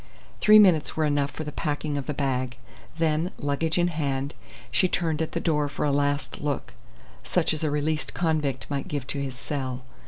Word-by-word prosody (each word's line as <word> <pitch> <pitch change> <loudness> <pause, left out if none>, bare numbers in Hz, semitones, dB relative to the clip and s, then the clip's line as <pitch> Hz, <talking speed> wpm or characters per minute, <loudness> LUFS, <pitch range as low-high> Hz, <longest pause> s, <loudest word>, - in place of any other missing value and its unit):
Three 215 0 +8
minutes 180 -9 +5
were 155 - +3
enough 145 -1 +1
for 155 - -6
the 150 - -5
packing 150 -1 -2
of 140 -2 -3
the 150 - -1
bag; 130 -2 -1 0.4
then, 160 +1 +1
luggage 155 +3 0
in 175 0 +3
hand, 140 -3 -2 0.4
she 185 - +3
turned 165 -3 0
at 160 - -2
the - - 0
door 150 -3 +1
for 145 - -2
a 145 - +2
last 145 +1 0
look, 145 - -2 0.5
such - - +1
as 155 - -3
a 155 - +2
released 150 +1 -1
convict 155 -6 0
might 140 -1 -3
give 145 -3 -3
to 140 +1 -3
his 135 -2 -4
cell. 130 -2 -4
145 Hz, 195 wpm, -26 LUFS, 140-160 Hz, 0.5 s, Three